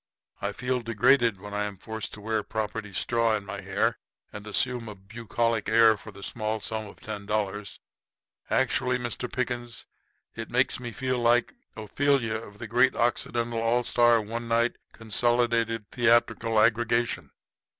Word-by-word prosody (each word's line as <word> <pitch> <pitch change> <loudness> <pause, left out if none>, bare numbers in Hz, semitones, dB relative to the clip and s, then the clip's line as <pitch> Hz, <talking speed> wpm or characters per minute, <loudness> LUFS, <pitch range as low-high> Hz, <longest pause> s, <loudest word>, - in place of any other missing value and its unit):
I - - -1
feel 125 0 -2
degraded 115 -1 +3
when 105 +1 -9
I 105 0 0
am 100 -1 -6
forced 110 +3 -5
to 105 - -12
wear 110 0 0
property 110 0 -4
straw 115 +3 +1
in 100 -2 -4
my 100 -1 -6
hair 100 +4 0 0.3
and 105 +1 -8
assume 120 +1 -1
a 105 - -8
bucolic 115 +2 -2
air 110 0 +6
for 105 - -12
the 100 -1 -11
small 110 0 -2
sum 110 +1 -4
of - - -14
ten 105 -2 -7
dollars. 105 -1 -2 0.7
Actually, 130 0 +2
Mr. 125 0 -4
Pickens, 120 -2 -3 0.5
it 115 0 -6
makes 125 +1 +1
me 120 -1 -6
feel 130 +2 -2
like 120 0 +3 0.2
the - - -7
Ophelia 130 0 +1
of 105 -2 -11
the 120 - -7
Great 125 +4 +3
Occidental 120 -1 0
All 120 +2 +2
Star 120 -1 +4
One 115 +2 -5
Night 115 +1 +1
Consolidated 115 -1 0
Theatrical 115 -2 +3
Aggregation." 115 +1 +2
115 Hz, 160 wpm, -27 LUFS, 105-120 Hz, 0.7 s, air